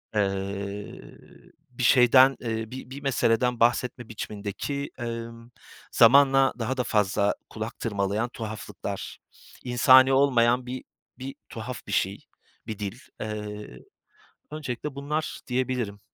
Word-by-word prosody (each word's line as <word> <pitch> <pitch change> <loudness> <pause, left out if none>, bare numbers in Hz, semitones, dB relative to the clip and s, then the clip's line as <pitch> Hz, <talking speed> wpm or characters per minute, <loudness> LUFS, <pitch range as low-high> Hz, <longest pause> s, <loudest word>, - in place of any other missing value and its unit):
eee, 100 0 -2 0.7
bir 125 0 -5
şeyden, 130 +1 +6
eee, 110 -1 -3
bi 130 -1 -8
bir 140 +2 -7
meseleden 125 -2 +1
bahsetme 120 0 +1
biçimindeki, 110 +7 -5
emm, 115 0 -6 0.4
zamanla 135 +2 +6
daha 125 +4 -2
da 125 - +1
fazla 100 -2 +1
kulak 110 +1 -6
tırmalayan 105 +1 -1
tuhaflıklar, 110 -2 -6 0.5
insani 130 +2 +6
olmayan 125 -2 +3
bir 125 +1 -6 0.4
bir 135 +1 -6
tuhaf 115 0 -7
bir - - -6
şey, 95 +1 +1 0.5
bir 110 -2 -5
dil. 105 +4 -5 0.2
Eee, 105 -9 -6 0.7
öncelikle 145 -2 -5
bunlar 150 +2 -3
diyebilirim. 125 -5 -2
120 Hz, 110 wpm, -26 LUFS, 105-130 Hz, 0.7 s, şeyden